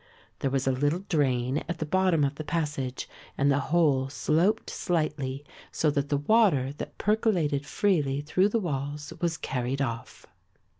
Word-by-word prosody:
There 135 - 0
was 135 0 0
a 135 - +3
little 145 +8 0
drain 130 -3 +1
at 170 - -2
the 155 - -3
bottom 185 -1 +2
of 140 0 +1
the 155 - -6
passage 150 -5 -3 0.3
and 140 +1 +3
the 140 - +2
whole 145 -6 +3
sloped 175 +10 +1
slightly 150 -5 -2 0.3
so 155 - +1
that 140 0 -1
the 145 - +2
water 145 - +3
that - - -7
percolated 175 -10 +1
freely 150 -9 +1
through 185 +7 +2
the 230 - +1
walls 145 -3 -4
was 170 -2 0
carried 130 +1 -2
off. 115 -4 -4
145 Hz, 160 wpm, -27 LUFS, 135-170 Hz, 0.3 s, a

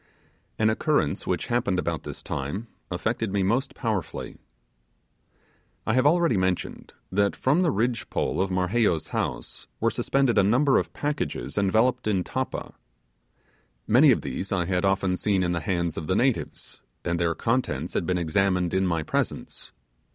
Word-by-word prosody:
An 110 0 +3
occurrence 110 - 0
which - - -1
happened 120 -6 0
about 85 -2 -1
this - - -8
time 75 +12 -4 0.2
affected 110 +4 -2
me 100 -1 +1
most 125 +8 0
powerfully. 110 - -3 1.5
I 110 - +1
have 130 +3 +4
already 170 - +3
mentioned 95 -1 -2 0.2
that 100 +1 +2
from 145 +7 +2
the 175 - +3
ridge 115 +4 -1
pole - - -1
of 95 - 0
Marheyo's 90 -3 +1
house - - -4
were - - +2
suspended 135 -5 +2
a - - +5
number 130 +8 +4
of - - -4
packages 145 0 -3
enveloped 110 +5 +2
in 95 -4 +1
tappa. - - -4 1.1
Many - - +6
of - - +4
these 95 - -5
I 90 -3 +1
had 90 +1 0
often 95 -1 +1
seen 100 -2 +1
in 90 - 0
the 85 - 0
hands 85 -1 -1
of 80 - -7
the 95 - +1
natives, 130 +2 -1 0.2
and 85 -1 0
their 85 -1 +1
contents 125 +3 -1
had - - -1
been 90 -1 +1
examined 90 +1 +1
in 95 0 +2
my 85 -3 0
presence. - - -3
100 Hz, 160 wpm, -26 LUFS, 90-120 Hz, 1.5 s, Many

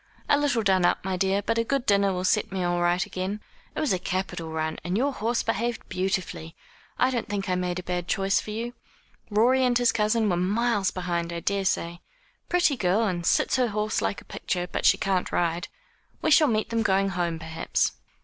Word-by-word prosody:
"A - - +5
little 285 -6 +1
done 190 -3 +3
up, 175 - +2
my 190 -1 -1
dear, 195 +2 +1
but 230 +3 0
a - - +2
good 270 +2 -1
dinner 200 -1 +3
will 180 -1 -2
set 205 +3 +1
me 190 -1 -2
all 175 0 0
right 175 +1 +2
again. 190 +3 -4 0.4
It - - -2
was 305 -9 +1
a 185 - 0
capital 180 -3 -3
run, 160 0 -3
and 180 +4 -1
your 275 +4 +1
horse 235 +1 -1
behaved 230 +2 -2
beautifully. 180 -3 -3 0.4
I 255 - +3
don't 240 -4 -3
think 200 -1 -2
I 185 - +1
made 180 0 -1
a 180 - -5
bad 180 -1 -3
choice 195 +2 +1
for - - -10
you. 230 +3 -4 0.6
Rorie 240 +5 +3
and 245 -1 +3
his 245 -1 +3
cousin 215 +1 +1
were 180 -3 +1
miles 205 +2 +1
behind, 170 -2 -3
I 170 - -3
daresay. 180 -2 -1 0.5
Pretty 350 -5 +3
girl, 195 +3 +2
and 175 -5 -1
sits - - +2
her 250 -1 +2
horse 215 0 -1
like - - -2
a - - -19
picture 180 -1 -3
but - - 0
she - - +5
can't 190 -2 -1
ride. 170 0 0 0.5
We 315 - 0
shall 305 0 +6
meet 220 -3 0
them 230 0 +1
going 195 -2 +2
home, 175 -3 -1
perhaps." 160 0 -1
195 Hz, 215 wpm, -26 LUFS, 180-230 Hz, 0.6 s, shall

